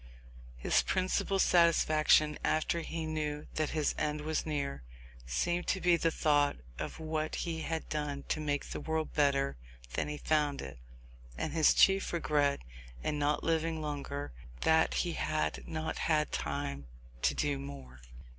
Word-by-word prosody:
His - - +3
principal 185 +1 0
satisfaction, 155 -4 +4
after 155 +2 +1
he 165 0 -4
knew 150 -1 -3
that 155 -1 0
his 155 -2 0
end 150 0 -1
was 155 +1 -2
near, 140 - -2 0.5
seemed 175 - 0
to 190 - +1
be 175 -1 +4
the 165 0 +2
thought 145 -2 +2 0.2
of - - -5
what 155 -1 -2
he 165 -2 -3
had 160 0 -3
done 145 -2 -3
to - - 0
make 145 -2 -1
the - - -5
world 160 -1 -2
better 140 - +2 0.4
than - - -1
he 150 0 -4
found 150 -2 +1
it; 65 -2 -7 0.6
and - - -3
his 160 -2 +5
chief 195 0 +4
regret 145 -4 +1 0.4
in 150 - -1
not 145 +1 +1
living 165 0 0
longer, 145 - -4 0.3
that - - +3
he - - -2
had 75 0 -2
not 160 0 -3
had 155 -2 +1
time 70 -1 -3 0.3
to - - +2
do 70 -2 0
more. 70 -2 -9
150 Hz, 155 wpm, -32 LUFS, 145-160 Hz, 0.6 s, his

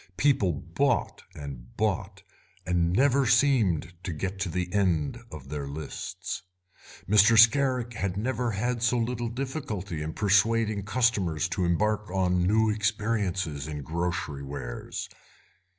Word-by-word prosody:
People 130 -10 +3
bought 70 - -1
and 65 -4 -9
bought, 100 -2 -1 0.4
and 85 -2 +1
never 135 +5 +3
seemed 120 - +3
to 90 - -4
get 95 +5 -4
to 95 -2 -1
the 90 +1 -3
end 90 -8 +1
of - - -9
their 75 -2 -4
lists. 75 +2 -6 0.7
Mr. 105 +3 +6
Scarrick 125 +1 +4
had 95 -3 -2
never 120 +2 -1
had 120 +3 -1
so 120 +1 +2
little 120 0 -1
difficulty 120 - -4
in 80 +1 -4
persuading 105 0 +2
customers 105 - +1
to 90 +1 -1
embark 105 +4 0
on 90 -1 +1
new 110 +2 +3
experiences 100 -8 -1
in 75 -2 -5
grocery 80 -2 -3
wares. 70 -4 -6
100 Hz, 130 wpm, -27 LUFS, 85-115 Hz, 0.7 s, Mr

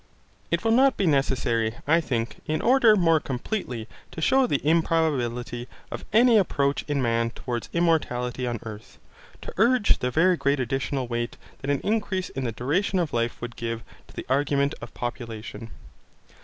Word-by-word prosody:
It 170 +3 0
will 225 - +2
not 265 +3 +4
be 200 - +1
necessary, 125 -6 +1
I 165 +3 +4
think, 120 -6 -2
in 155 0 0
order 240 -3 +5
more 165 -5 +4
completely 130 - -4 0.2
to - - -9
shew 260 +10 +3
the 140 - +1
improbability 135 -7 0 0.2
of - - -6
any 230 +1 +6
approach 140 -7 +1
in 145 -3 0
man 115 -1 +1
towards 120 0 -5
immortality 130 -7 0
on 120 -2 -2
earth, 110 -1 -10 0.5
to - - -7
urge 235 +1 +3
the 125 - 0
very 175 +7 +3
great 140 -1 +1
additional 130 +1 -2
weight 120 0 -3 0.2
that 135 - -5
an 140 -1 +1
increase 205 -3 -1
in 135 -1 -4
the 115 - -1
duration 150 - 0
of 170 -4 -1
life 115 0 -1
would 120 0 -6
give 115 -1 -4 0.2
to - - -17
the - - -6
argument 140 +1 +1
of - - -8
population. 115 -2 -6
140 Hz, 170 wpm, -25 LUFS, 120-170 Hz, 0.5 s, any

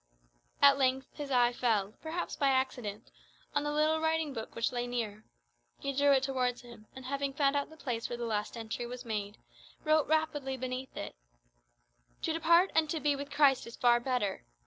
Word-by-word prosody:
At 280 0 +7
length 265 0 +1
his 290 -2 -6
eye 245 -2 +3
fell, 215 -5 0
perhaps 330 +2 -4
by 280 - +1
accident, 245 -5 -1 0.4
on 290 - +2
the 295 0 -2
little 310 +1 +2
writing 320 -2 0
book 225 -2 -7
which 230 - 0
lay 245 -1 -2
near. 220 -3 -3 0.5
He 275 - -3
drew 285 +1 +3
it 270 -1 +4
towards 255 -2 -1
him, 235 -3 -14
and 260 -1 -9
having 280 +1 -2
found 280 0 +2
out 285 - 0
the 315 - -14
place 240 -6 -3
where 240 - -4
the 240 - -3
last 215 0 -2
entry 230 +1 -4
was 250 +1 -7
made, 210 -2 -3 0.5
wrote 310 -1 +3
rapidly 295 -4 0
beneath 255 +1 -5
it, - - -5 1.1
"To 325 - 0
depart 335 +3 +4
and 315 -1 +3
to 320 - -1
be 295 -1 +2
with 280 +1 -6
Christ 275 -5 +3
is 235 - -9
far 240 -1 +4
better. 240 - -1
265 Hz, 190 wpm, -31 LUFS, 240-290 Hz, 1.1 s, At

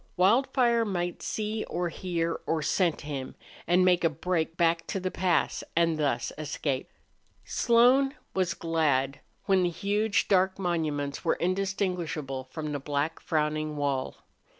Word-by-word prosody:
Wildfire 235 +4 +3
might 175 -4 -2
see 215 0 -2
or 175 0 -2
hear 170 -1 -2
or 160 -2 0
scent 170 +1 +1
him, 140 -3 -5 0.3
and 180 +2 +4
make 180 -1 +4
a 165 - +4
break 165 +1 -2
back 165 -1 +2
to 195 - -2
the 185 0 -3
pass 180 -2 +1
and 165 -1 +2
thus 135 -5 0
escape. 145 -3 -2 0.6
Slone 255 +4 +4 0.2
was 185 -2 0
glad 145 -5 0 0.3
when 190 -2 +3
the 175 - +2
huge, 205 +4 0
dark 190 -1 +3
monuments 155 -6 -2
were - - +2
indistinguishable 180 -7 -2
from 150 +3 -5
the 145 - -2
black, 145 +3 -2
frowning 155 -1 -1
wall. 140 -2 -2
170 Hz, 140 wpm, -28 LUFS, 150-190 Hz, 0.6 s, and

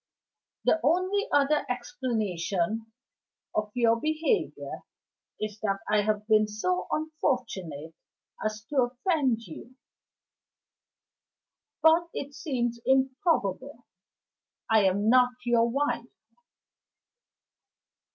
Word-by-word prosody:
The 320 - +4
only 370 - +1
other 290 +1 +3
explanation 220 -4 -2 0.6
of 215 0 -1
your 230 -1 +3
behavior 315 +7 -1 0.6
is 215 0 -4
that 195 -2 -1
I 210 0 +3
have 210 0 -1
been 215 -1 +4
so 185 -4 -1
unfortunate 235 - -2 0.5
as 215 0 -3
to 295 - -3
offend 255 -1 +1
you. 235 +9 -11 2.1
But 330 +1 +5
it 280 +1 -5
seems 240 -5 -2
improbable 265 - 0 0.9
I 220 -2 +5
am 200 +3 +2
not 250 +1 +5
your 235 -1 +3
wife." 285 +4 -1
240 Hz, 90 wpm, -28 LUFS, 210-285 Hz, 2.1 s, But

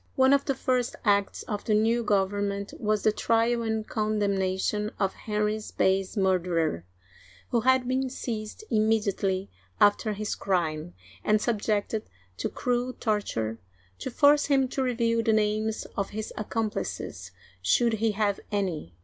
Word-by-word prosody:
One 265 +1 +5
of 280 0 +3
the 275 - 0
first 255 -2 0
acts 200 -1 +2
of 210 -2 -4
the 215 - +2
new 225 +3 +3
government 200 0 0
was 215 -1 0
the 215 - +4
trial 230 +2 +1
and 220 -1 -2
condemnation 210 -1 0
of 195 -1 +1
Henry's 210 0 -2
base 190 +2 +1
murderer, 175 - +1 0.7
who 235 - +2
had 260 +1 +3
been 260 +1 0
seized 225 - -5
immediately 205 -3 +1 0.3
after 205 +1 +4
his 210 +1 -3
crime, 155 - -1 0.3
and 215 - +3
subjected 215 -1 -1 0.3
to - - -2
cruel 250 0 -1
torture 115 - -2 0.4
to - - -4
force 290 +3 +4
him 270 -2 +3
to 270 - -2
reveal 230 -2 +1
the 225 0 +2
names 215 +1 0
of 200 -1 -1
his 215 +1 -5
ac 215 - -5
complices, 225 -2 -3 0.3
should 235 -2 +3
he 225 -1 +2
have 205 -1 0
any. 180 - -2
215 Hz, 145 wpm, -27 LUFS, 200-230 Hz, 0.7 s, One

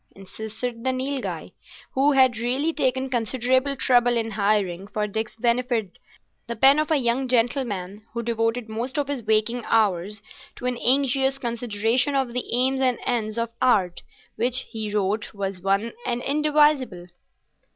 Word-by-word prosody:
insisted 220 +4 -7
the 260 - +1
Nilghai, 260 +1 -4 0.4
who 280 +2 +3
had 260 -4 +4
really 260 +7 0
taken 260 -3 0
considerable 260 +3 0
trouble 245 -2 +3
in 225 -1 -2
hiring 200 -3 0
for 210 0 -2
Dick's 220 +2 -4
benefit 235 -4 0 0.5
the 235 - -4
pen 270 +6 +6
of 310 - 0
a 315 - +3
young 255 0 0
gentleman 230 -6 -1
who 235 0 -4
devoted 230 0 -1
most 235 +6 -4
of 290 -2 0
his 280 -3 -3
waking 220 +2 +1
hours 205 -1 +1 0.3
to - - -8
an 250 -1 0
anxious 270 +1 +2
consideration 235 +2 0
of 265 -3 0
the 250 - -3
aims 260 +2 +1
and 255 -2 +2
ends 225 -3 -1
of 230 0 -2
Art, 190 -8 +2 0.4
which, 245 +3 +2
he 215 -2 -6
wrote, 210 +1 -1
was 195 -2 -4
one 195 +4 0
and 245 0 -2
indivisible. 295 -9 +2
240 Hz, 150 wpm, -24 LUFS, 215-260 Hz, 0.5 s, pen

